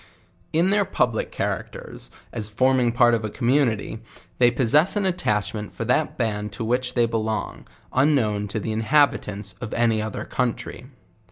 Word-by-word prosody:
In 170 +4 +2
their 205 0 +3
public 120 - -1
characters, - - -5 0.2
as 110 -3 -3
forming 130 +2 +2
part 120 0 +4
of 115 -1 0
n 110 - -2
communi 125 0 +2
ty, 110 - -7 0.4
they 120 -1 +6
possess 135 - +3
an 205 -1 0
attachment 105 - -1
for 115 - -4
that 135 +6 +1
band 105 -3 -2
to 110 - -4
which 125 +2 -1
they 120 -1 +4
belong, 110 -1 -3 0.3
unknown 120 -7 +2
to 100 +2 -3
the 110 - -3
inhabitants 110 -4 +1
of 120 - -5
any 115 -2 +2
other 110 -1 -4
country. 125 -2 -3
115 Hz, 160 wpm, -23 LUFS, 110-130 Hz, 0.4 s, they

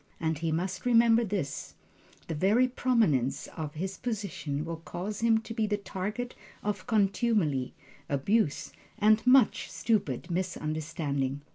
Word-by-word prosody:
And 160 -2 -1
he 165 -1 -1
must 185 +3 -2
remember 235 -1 +5
this: 190 -10 -3 0.5
the - - -2
very 205 +11 +3
prominence 225 - +1
of 155 -3 -5
his 190 +4 -4
position 190 - -3
will 165 0 -4
cause 185 +5 -5
him 230 -1 +4
to 225 - -7
be 220 -1 0
the 205 0 0
target 210 +5 -4 0.3
of 205 -2 -3
contumely, 195 - +1 0.3
abuse 145 +4 +1 0.3
and 215 +1 +4
much 260 0 +5
stupid 190 - -1
misunderstanding. 155 -5 -2
190 Hz, 130 wpm, -29 LUFS, 155-225 Hz, 0.5 s, remember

